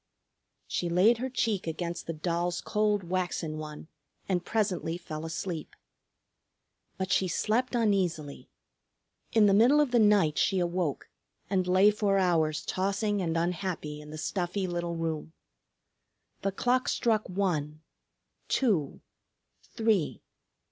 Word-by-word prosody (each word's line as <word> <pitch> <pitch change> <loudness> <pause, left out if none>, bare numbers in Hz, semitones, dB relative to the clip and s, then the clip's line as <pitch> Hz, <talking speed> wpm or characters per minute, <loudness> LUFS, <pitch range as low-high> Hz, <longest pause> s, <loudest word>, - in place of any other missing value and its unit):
She 175 - -2
laid 200 +7 +4
her 260 +2 -2
cheek 220 -7 -1
against 170 +2 -4
the 165 - -2
doll's 170 +2 -1
cold 210 -1 0
waxen 175 -3 -2
one 155 0 -8 0.4
and 180 -3 0
presently 185 -6 -1
fell 155 -2 -7
asleep. 165 0 -5 1.2
But 190 -1 -3
she 185 +1 +3
slept 230 +8 0
uneasily. 185 -10 0 0.8
In 220 -2 +6
the 200 - +5
middle 240 +9 +6
of 295 -4 +2
the 240 - +4
night 205 -8 +4
she 195 - +2
awoke 175 -4 -1 0.4
and 185 -2 +1
lay 190 +3 +5
for 205 -2 +1
hours 160 -5 +1
tossing 200 +2 0
and 165 -2 -1
unhappy 165 -3 -2
in 150 - -12
the 155 - -7
stuffy 180 +4 -2
little 175 -1 -3
room. 160 -1 -3 1.1
The 195 - 0
clock 250 +6 +1
struck 220 -4 +1
one, 155 -6 -1 0.7
two, 190 - +1 0.6
three. 220 -8 0
180 Hz, 125 wpm, -29 LUFS, 165-205 Hz, 1.2 s, In